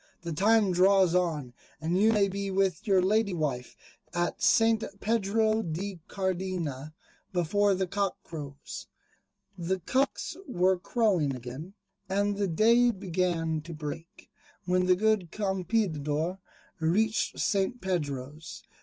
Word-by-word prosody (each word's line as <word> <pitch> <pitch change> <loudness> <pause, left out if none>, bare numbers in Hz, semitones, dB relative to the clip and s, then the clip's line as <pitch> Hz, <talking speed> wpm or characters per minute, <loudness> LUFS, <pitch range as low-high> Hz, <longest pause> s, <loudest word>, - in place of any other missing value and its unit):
The 170 -1 -3
time 210 +3 +3
draws 185 0 +4
on, 160 -8 0 0.3
and 165 +3 -1
you 215 +4 +4
may 205 -3 +3
be 200 +1 -3
with 195 +2 0
your 190 -3 +4
Lady 205 0 +2
Wife 140 -6 -3 0.4
at 175 0 -1
St. 225 -1 +4 0.2
Pedro 220 0 +1
de 180 +1 -4
Cardena, 180 -7 -3 0.4
before 195 +3 +2
the 190 0 0
cock 195 +1 -1
crows." 145 -3 -8 0.7
The 185 +2 -1
cocks 265 - -1
were 185 -6 +2
crowing 185 - +1
again, 130 - -8 0.3
and 200 +1 +1
the 200 0 0
day 230 +8 +4
began 175 -5 -1
to 165 +1 -8
break, 155 +2 -8 0.4
when 180 0 +2
the 180 - +5
good 215 -3 +1
Campeador 185 -5 -1 0.4
reached 205 +7 +1
St. 200 +4 0
Pedro's. 150 - -4
185 Hz, 125 wpm, -28 LUFS, 165-205 Hz, 0.7 s, the